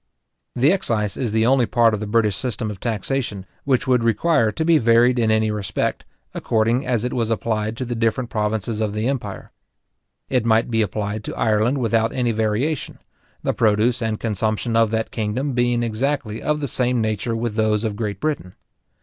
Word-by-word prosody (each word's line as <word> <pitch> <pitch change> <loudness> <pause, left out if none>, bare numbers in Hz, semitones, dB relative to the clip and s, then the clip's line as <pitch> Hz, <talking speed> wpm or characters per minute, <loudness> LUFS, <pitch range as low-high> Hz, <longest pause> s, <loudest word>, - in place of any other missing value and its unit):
The 135 +6 +4
excise 110 - -1
is 120 -5 -2
the 110 +1 +2
only 125 -1 +3
part 115 -2 +3
of 105 - -1
the 105 - -4
British 105 -2 +2
system 115 -2 -3
of 100 - -9
taxation, 115 -2 -2 0.2
which 130 -3 +1
would 125 -2 +3
require 115 0 +2
to 160 - -2
be 165 -1 +5
varied 120 +2 +4
in 115 -2 +2
any 110 0 +2
respect, 100 -3 -2 0.3
according 115 +4 0
as 120 -2 0
it 125 - -2
was 115 -2 -1
applied 110 -1 -1
to 130 - -3
the 120 - -3
different 115 +1 -1
provinces 105 0 -1
of 105 -2 -1
the 110 +2 -1
empire. 120 -8 -4 0.8
It 125 -3 +1
might 115 +1 +2
be 115 -1 +2
applied 105 +1 -2
to - - -5
Ireland 110 +4 +2
without 115 -2 +1
any 125 -2 0
variation; 110 +8 -1 0.5
the - - 0
produce 110 +2 +2
and 110 -1 -1
consumption 110 +1 -1
of 115 -1 +4
that 110 0 -2
kingdom 120 +6 -2
being 120 -1 +1
exactly 120 0 -2
of 150 0 -1
the 140 - -1
same 125 0 +1
nature 110 +1 -1
with 115 -1 -2
those 110 0 +1
of 110 -3 -2
Great 105 -2 -3
Britain. 150 -12 -3
115 Hz, 190 wpm, -21 LUFS, 110-125 Hz, 0.8 s, be